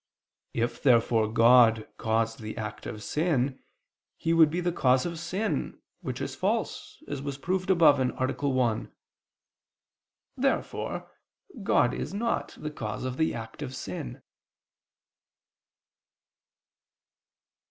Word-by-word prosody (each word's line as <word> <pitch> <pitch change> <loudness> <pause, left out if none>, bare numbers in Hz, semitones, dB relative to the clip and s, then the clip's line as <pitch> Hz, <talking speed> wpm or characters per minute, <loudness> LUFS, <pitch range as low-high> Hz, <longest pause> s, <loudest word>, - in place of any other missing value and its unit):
If 120 +1 -1
therefore 115 -4 +3
God 115 -1 +6
caused 115 0 0
the 110 -1 -7
act 105 -1 -5
of 105 -1 -6
sin, 145 -5 0 0.6
He 165 - 0
would 160 -2 +6
be 170 +4 -2
the 175 0 0
cause 130 -5 +3
of 170 -2 -4
sin, 190 +6 -2 0.2
which - - -4
is - - -3
false, - - -2
as 140 - -4
was 140 -1 -4
proved 185 +6 -2
above 160 -6 +6
(A. 130 - +2 0.4
1). 125 -4 0 1.4
Therefore - - -2 0.5
God - - +3
is - - -4
not 230 +3 -1
the 150 - -4
cause 110 -4 -5
of 130 0 -3
the 160 - +1
act 110 +3 -8
of 130 -2 -5
sin. 90 - -6
130 Hz, 120 wpm, -28 LUFS, 115-160 Hz, 1.4 s, God